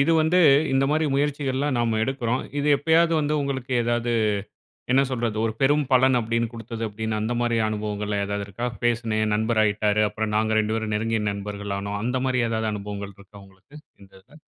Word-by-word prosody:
இது 155 +4 +3
வந்து 160 +3 +3 0.3
இந்தமாரி 145 +4 +2
முயற்சிகள்லாம் 140 -1 0
நாம 115 -2 +1
எடுக்கிறோம். 130 -1 -1 0.2
இது 145 +1 0
எப்பயாவது 165 +3 +3
வந்து 150 +1 0
உங்களுக்கு 130 -2 -3
ஏதாவது 120 0 0 0.8
என்ன 135 - +5
சொல்றது 115 -3 -2
ஒரு 110 - -1
பெரும் 145 +1 +3
பலன் 130 0 +5
அப்பிடின்னு 115 0 -1
குடுத்தது 115 0 -6
அப்பிடின்னு 110 +1 -3
அந்தமாரி 120 +2 0
அனுபவங்கள்ல 105 -1 -3
எதாவது 100 0 -3
இருக்கா? 115 +5 -5 0.2
பேசினேன், 115 -2 0
என் 105 - 0
நண்பர் 110 +1 0
ஆயிட்டாரு. 105 0 +1
அப்புறம் 110 -1 -3
நாங்க 110 0 +1
2 110 0 +1
பேரும் 110 -1 -2
நெருங்கிய 110 0 -1
நண்பர்கள் 100 0 -5
ஆனோம். 100 +1 -4
அந்தமாரி 130 +1 0
ஏதாவது 110 -1 -1
அனுபவங்கள் 100 -1 -6
இருக்கா 100 +1 -18
உங்களுக்கு 95 +7 -22 0.3
இந்த 95 -1 -17
இதுல? 150 +10 -19
115 Hz, 170 wpm, -24 LUFS, 105-130 Hz, 0.8 s, என்ன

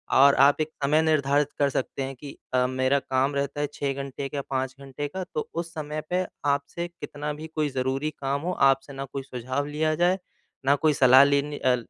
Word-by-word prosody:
और 140 +1 +7
आप 145 +2 +4
एक 155 - -1
समय 150 +3 +4
निर्धारित 145 -2 +2
कर 140 -1 +3
सकते 135 +1 -2
हैं 135 0 -5
कि 140 +2 -10 0.2
अ, 125 0 +3
मेरा 130 +2 +1
काम 135 +2 0
रहता 140 +1 -2
है 145 - 0
6 140 -1 -2
घंटे 140 0 -5
का 140 -1 -3
5 130 -1 -2
घंटे 140 +2 -5
का 190 +4 -4
तो 155 - -2
उस 170 -1 -4
समय 155 0 -4
पे 185 +1 +1 0.2
आपसे 145 +4 -1
कितना 150 -3 -6
भी 155 +2 -8
कोई 150 -2 +1
ज़रूरी 135 +3 -1
काम 140 +1 -1
हो 180 - -2 0.2
आपसे 135 +1 -1
ना 135 0 -5
कोई 135 +1 -6
सुझाव 130 +2 -3
लिया 155 +1 0
जाए, 180 +3 +2 0.5
ना 140 +1 +5
कोई 155 +1 +2
सलाह 130 0 +7
लेनी 145 +1 +1
अ, 130 -1 +3
140 Hz, 210 wpm, -26 LUFS, 135-150 Hz, 0.5 s, और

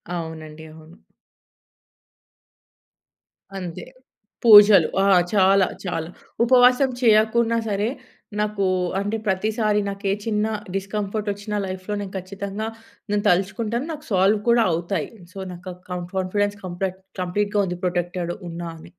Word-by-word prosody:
అవునండి. 160 -2 -7
అవును. 160 +2 -16 2.6
అంతే. 175 -3 -6 0.6
పూజలు. 205 -6 +9 0.2
ఆ! - - +3 0.3
చాలా 195 -1 +4 0.2
చాలా. 165 -2 -3 0.3
ఉపవాసం 250 +2 +5
చేయకున్నా 225 +1 +3
సరే, 205 +2 0 0.5
నాకు 210 -2 0 0.3
అంటే 205 +3 -2
ప్రతిసారి 210 +2 +1
నాకే 200 0 -2
చిన్న 215 -1 0 0.3
డిస్‌కంఫర్టోచ్చిన 205 +1 -3
లైఫ్‌లో 185 +2 -5
నేను 195 -1 -7
ఖచ్చితంగా, 200 +3 -5 0.4
నేను 205 0 0
తలుచుకుంటాను 220 - 0
నాకు 300 0 -10
సాల్వ్ 195 +2 +3
కూడా 235 0 +5
అవుతాయి. 175 +4 -2 0.2
సో, - - -12
నాక 180 +1 -8
కం 180 -1 -3
కాన్ఫిడెన్స్ 205 +2 0
కంప్లెట్ 185 +1 -4 0.2
కంప్లీట్‌గా 205 +3 0
ఉంది, 180 -1 -4
ప్రొటెక్టెడ్ 175 -1 -2 0.2
ఉన్నా 170 0 -6
అని. 160 - -13
200 Hz, 110 wpm, -23 LUFS, 180-210 Hz, 2.6 s, పూజలు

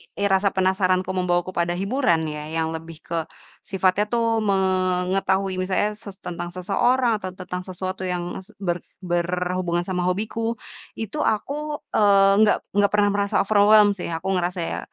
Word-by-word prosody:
rasa 200 0 +2
penasaranku 185 -1 +1
membawaku 180 -1 0
pada 175 -1 0
hiburan 195 - +1
ya, 150 0 -6 0.2
yang 160 - -1
lebih 160 0 -8
ke 170 - -3 0.5
sifatnya 190 +1 +1
tuh 230 0 +1
mengetahui 190 0 +1
misalnya 185 +3 +1
se 205 -2 -10
tentang 175 0 -5
seseorang 230 +6 +1
atau 185 -1 -5
tentang 180 0 -6
sesuatu 185 0 -5
yang 175 -1 -3
es 190 - -14
ber 175 -2 -1 0.2
berhubungan 175 0 -1
sama 180 -1 -2
hobiku, 220 +5 -1 0.4
itu 225 +5 -5
aku 295 +6 -1
eee, 200 -2 +5
enggak 215 -1 +5
enggak 200 0 +2
pernah 205 -1 +4
merasa 200 0 -1
overwhelmed 205 0 +5
sih, 180 - -5
aku 165 +4 -3
ngerasa 180 +1 -2
ya, 165 - -3
190 Hz, 150 wpm, -23 LUFS, 180-205 Hz, 0.5 s, eee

